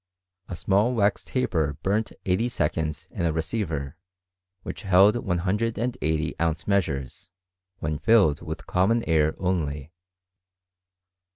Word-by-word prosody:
A 90 - -4
small 100 +8 +2
wax 100 -2 +2
taper 80 - -1
burnt 105 +3 0
eighty 95 +6 +1
seconds 75 - -2
in - - -3
a 85 - +2
receiver 80 -4 -3 0.7
which - - -6
held 95 0 +5
ISO 100 -4 -1
ounce 80 -1 -1
measures, 75 -10 -1 0.5
when 75 0 -3
filled 100 -11 +4
with - - -6
common 110 +6 +2
air 80 -1 +2
only. 80 -5 -2
90 Hz, 110 wpm, -25 LUFS, 80-105 Hz, 0.7 s, held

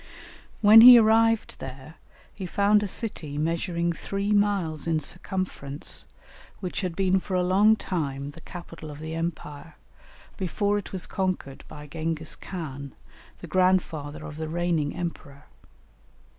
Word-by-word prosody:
When 215 +1 +9
he 245 +1 +11
arrived 225 0 +3
there, 135 +3 -9 0.4
he 190 -3 -6
found 205 +3 +3
a 205 - -2
city 175 -9 -5
measuring 170 +2 -1
three 200 +4 -3
miles 200 -7 +1
in 160 -1 +1
circumference, 155 -3 -4 0.5
which 185 +1 -4
had 180 -4 -3
been 190 0 +2
for 185 0 -4
a 180 - +2
long 200 +4 +4
time 140 -8 -4
the 165 +3 -14
capital 165 -3 -10
of 145 - -9
the 160 +1 -6
Empire, 160 -2 -5 0.6
before 205 +2 0
it 205 - -10
was 185 -2 -4
conquered 185 -8 -3
by 150 0 -10
Gengis 160 +1 -3
Khan, 140 -7 -7 0.5
the 175 - -8
grandfather 165 -4 0
of 150 - -8
the 160 0 -4
reigning 165 -3 -1
emperor. 150 -5 -6
170 Hz, 140 wpm, -26 LUFS, 155-195 Hz, 0.6 s, he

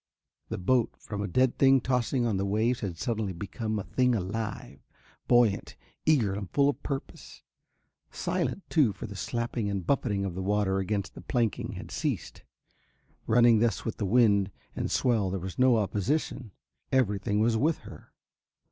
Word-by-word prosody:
The - - -3
boat, 115 +5 +1
from 105 -1 -6
a 100 - -2
dead 125 +6 +1
thing 135 0 +6
tossing 125 0 0
on 110 -4 0
the 95 - -1
waves, 110 +4 +1
had 90 -5 -4
suddenly 110 -3 -2
become 110 +5 -4
a 100 - -3
thing 125 +2 +1
alive, 105 +2 -4 0.5
buoyant, 120 -5 +3 0.3
eager 125 -11 +3
and 100 -2 -5
full 140 - +3
of 145 - -3
purpose, 135 -2 -6 0.7
silent, 195 - -2
too, 140 - +3
for - - -8
the 100 - -8
slapping 115 +1 -2
and 100 -3 -3
buffeting 105 -8 0
of 95 - -3
the 95 - -4
water 95 0 +1
against 100 -1 -2
the - - -10
planking 115 -4 -1
had - - -8
ceased. - - -3 0.9
Running 120 -1 +5
thus 115 -3 0
with 115 - -3
the 100 - -1
wind 100 -3 +4 0.3
and - - -2
swell 115 -7 +1
there 95 - -2
was 95 +4 -7
no 130 -2 +5
opposition, 110 +4 -1 0.4
everything 105 -5 +1
was 115 +1 +3
with 150 +8 +2
her. - - -12
110 Hz, 165 wpm, -28 LUFS, 100-125 Hz, 0.9 s, thing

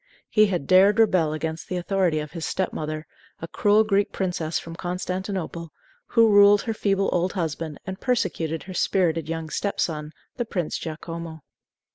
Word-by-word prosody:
He 215 -1 +5
had 180 -8 -2
dared 195 +5 +5
rebel 185 -8 +3
against 160 +1 -4
the 185 - -2
authority 180 -2 +1
of 150 -1 -4
his 165 -2 -6
step 190 +2 -1
mother, 155 0 -4 0.3
a 165 - -6
cruel 210 +5 +3
Greek 200 -1 +1
princess 175 -4 -2
from 165 0 -7
Constantinople, 180 -1 -4 0.4
who 230 -2 +4
ruled 205 0 +6
her 225 - -2
feeble 195 -2 +1
old 180 +1 0
husband 160 -3 -3
and 190 0 -6
persecuted 170 - -1
her 185 - -8
spirited 165 -4 +1
young 165 -1 -4
step 200 - -2
son, 150 -2 -2 0.3
the 240 - -1
Prince 180 -7 -3
Giacomo. 160 0 -7
180 Hz, 165 wpm, -24 LUFS, 160-200 Hz, 0.4 s, ruled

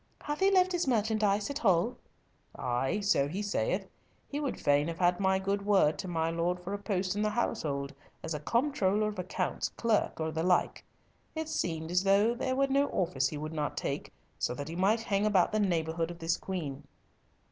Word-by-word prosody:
"Hath 295 0 -3
he 385 - +5
left 370 -1 +4
his 350 -4 0
merchandise 215 -3 +1
at 285 - -3
Hull?" 190 - +2 0.6
"Ay, 130 +10 -1
so 200 -9 +2
he 190 +8 -3
saith. 205 - -1 0.4
He 290 - -4
would 285 -3 -3
fain 145 +1 +3
have 165 -1 -4
had 175 0 +2
my 190 -1 +3
good 200 +1 -1
word 195 -7 +3
to 190 - -4
my 165 -2 0
lord 170 +2 -1
for 180 +3 -6
a 205 - -3
post 195 -2 -1
in 205 - -1
the 215 - +2
household, 145 -11 -2 0.3
as 160 - -3
comptroller 215 - +1
of 205 -3 -7
accounts, 180 +1 -2
clerk, 225 -7 0
or 160 0 -1
the 160 +1 -2
like. 180 +1 +1 0.5
It 315 0 -3
seemed 160 - -2
as 180 +1 +3
though 200 +4 +4
there 260 +1 -1
were 275 +1 +3
no 275 +1 +2
office 140 -8 0
he 150 - -5
would 155 +2 -5
not 150 -2 -2
take - - -3 0.3
so 125 - -1
that 145 +3 -6
he 165 - -5
might 200 +5 +2
hang 205 -2 +1
about 195 -4 +3
the 215 - +1
neighbourhood 165 -4 0
of 175 - -7
this 165 0 0
queen." 150 -8 -5
190 Hz, 200 wpm, -30 LUFS, 165-215 Hz, 0.6 s, he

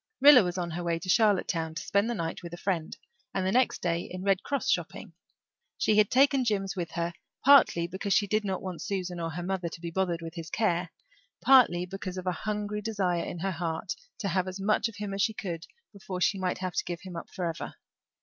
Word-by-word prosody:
Rilla 280 -2 +9
was 180 0 -3
on 175 -2 -2
her 175 +2 -4
way 170 -1 0
into 175 +3 -6
Charlottetown 180 -6 +2
to - - -4
spend 200 +3 +1
the 240 - -1
night 165 -2 -3
with 170 -1 -7
a - - -13
friend 175 -4 -2 0.4
and 190 -1 0
the 190 - +1
next 250 +3 +2
day 170 -1 +1
in 185 +1 -7
Red 195 -1 +2
Cross 280 -1 -1
shopping; - - -3 0.6
she 215 - +2
had 210 - +4
taken 270 0 +4
Jims 195 -4 -1
with 175 -3 -3
her, 170 0 -2 0.3
partly 270 -11 +6
because 190 +3 -4
she 205 +2 +4
did 215 +2 0
not 190 -2 -3
want 185 -3 -5
Susan 180 -3 -3
or 165 -1 -2
her 170 +3 -5
mother 185 -1 -2
to 170 - -9
be 170 0 -5
bothered 175 -2 -1
with 165 0 -6
his 165 -1 -7
care, 180 -5 0 0.5
partly 245 -10 +5
because 185 0 -6
of 185 - -5
a 180 - +1
hungry 210 +2 -3
desire 195 -6 0
in - - -5
her 195 +1 0
heart 170 +2 -3 0.2
to 200 - -2
have 185 +1 0
as 185 +1 -5
much 210 +2 +2
of 225 - -10
him 205 -2 -5
as 195 - -1
she 220 +2 +1
could 170 -5 -5 0.3
before 190 -2 -6
she 195 +2 +2
might 185 -1 -1
have 185 -1 -4
to - - 0
give 175 -1 -5
him 185 -3 -9
up 170 - -7
forever. 170 -3 -4
185 Hz, 235 wpm, -28 LUFS, 175-205 Hz, 0.6 s, Rilla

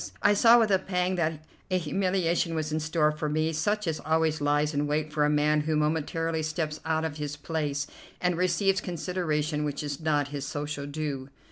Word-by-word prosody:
I 205 - +6
saw 230 +3 +7
with 225 -3 +3
a 190 - +4
pang 180 -1 0
that 155 -2 -1 0.2
a 185 - +2
humiliation 175 -1 0
was 155 -1 -2
in 155 - 0
store 155 0 +2
for 150 0 -3
me 155 +2 0
such 205 +7 0
as 160 -2 -1
always 160 -1 +1
lies 145 +1 +2
in 145 +1 0
wait 150 +1 -1
for 150 -1 +2
a - - +2
man 150 0 +3
who 155 +1 0
momentarily 160 +1 0
steps 155 0 -2
out 160 0 0
of 155 -2 -4
his 150 -1 -4
place 145 -2 -2 0.3
and 180 -1 +1
receives 185 +3 +2
consideration 160 -4 -1
which 145 0 -3
is 145 0 -4
not 145 -3 +1
his 145 -1 -4
social 145 0 -4
due. 145 -3 -4
155 Hz, 200 wpm, -28 LUFS, 150-170 Hz, 0.3 s, saw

